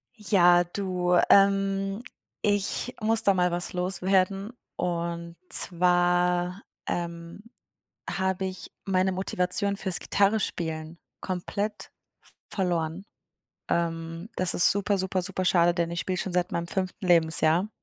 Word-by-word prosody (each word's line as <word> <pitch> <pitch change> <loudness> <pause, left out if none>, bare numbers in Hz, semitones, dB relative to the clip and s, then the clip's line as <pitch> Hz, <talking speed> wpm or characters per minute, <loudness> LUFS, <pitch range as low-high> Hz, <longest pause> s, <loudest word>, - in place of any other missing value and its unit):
Ja, 175 -4 +4
du, 180 -1 -1
ähm, 195 +1 +3 0.4
ich 205 +4 -1
muss 225 +1 +2
da 200 - +4
mal 180 -1 +1
was 175 +1 -3
loswerden, 190 +3 0 0.2
und 170 -1 -3
zwar, 180 +1 +1 0.3
ähm, 170 +2 -5 0.7
habe 190 0 -1
ich 185 -1 -6
meine 190 -1 +1
Motivation 190 +1 +1
fürs 190 -3 -1
Gitarrenspielen 170 -6 -1 0.2
komplett 200 +3 -4 0.6
verloren. 175 -2 -2 0.6
Ähm, 165 +2 -2
das 185 -1 +1
ist 175 - +6
super, 200 0 +1
super, 190 0 -1
super 185 0 -2
schade, 175 -1 +3
denn 170 -1 -1
ich 170 0 -2
spiele 185 -1 -2
schon 190 - -3
seit 180 0 0
meinem 170 0 -2
5. 185 +1 -3
Lebensjahr. 165 +2 +3
180 Hz, 120 wpm, -26 LUFS, 175-195 Hz, 0.7 s, ist